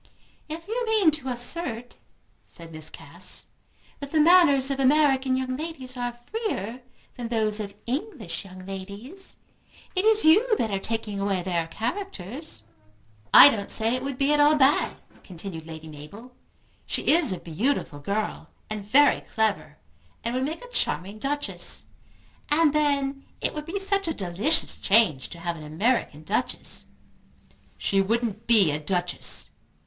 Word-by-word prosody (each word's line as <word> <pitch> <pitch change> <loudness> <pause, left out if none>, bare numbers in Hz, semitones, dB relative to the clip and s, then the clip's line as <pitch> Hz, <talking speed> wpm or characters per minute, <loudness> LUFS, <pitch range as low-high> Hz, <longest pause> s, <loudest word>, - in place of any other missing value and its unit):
"If 330 +3 -7
you 475 +3 -1
mean 425 -7 +4
to 295 -3 -4
assert," 245 -1 -4 0.5
said 165 -1 -12
Miss 155 -1 -5
Cass, - - -3 0.5
"that 280 -1 -7
the 315 - +2
manners 300 -5 +6
of 275 - -2
American 270 -1 +3
young 255 0 -2
ladies 275 -4 -6
are 245 -1 -2
freer 240 - -4 0.3
than 240 -2 -5
those 220 -2 0
of 200 -1 -6
English 240 - -4
young 185 -1 -11
ladies, 200 - -8 0.6
it 370 - +1
is 440 -2 +4
you 430 +8 +5
that 220 - -1
are 195 - 0
taking 215 -1 -3
away 195 -2 0
their 170 -2 -1
characters." 240 - -5 0.7
"I - - +11
don't 200 -2 -4
say 225 +1 +1
it 255 - -1
would 275 -1 -4
be 275 +2 +2
at 295 - +2
all 295 +1 +6
bad," 280 0 +3 0.3
continued 170 -3 -8
Lady 160 -1 -9
Mabel. 200 +12 -11 0.5
"She - - -1
is 320 - +4
a 185 - -2
beautiful 170 - -2
girl, 200 +8 -3 0.2
and 215 -1 -4
very 280 +8 +4
clever, 205 -9 -1 0.5
and 235 - -2
would 255 +1 0
make 320 - -5
a - - -14
charming 205 - -2
Duchess. 290 +4 -2 0.6
And 300 0 +4
then 280 -2 +1 0.2
it - - -1
would 300 0 -6
be 390 +4 -3
such 390 -1 0
a 325 - -1
delicious 200 - +2
change 190 - +3
to 170 - -9
have 170 0 -3
an 155 - -9
American 155 - 0
Duchess." 220 +9 -2 0.9
"She 195 -1 +1
wouldn't 225 +1 -1
be 210 -9 +5
a 150 - -2
Duchess." 175 +3 -1
240 Hz, 155 wpm, -26 LUFS, 195-295 Hz, 0.9 s, I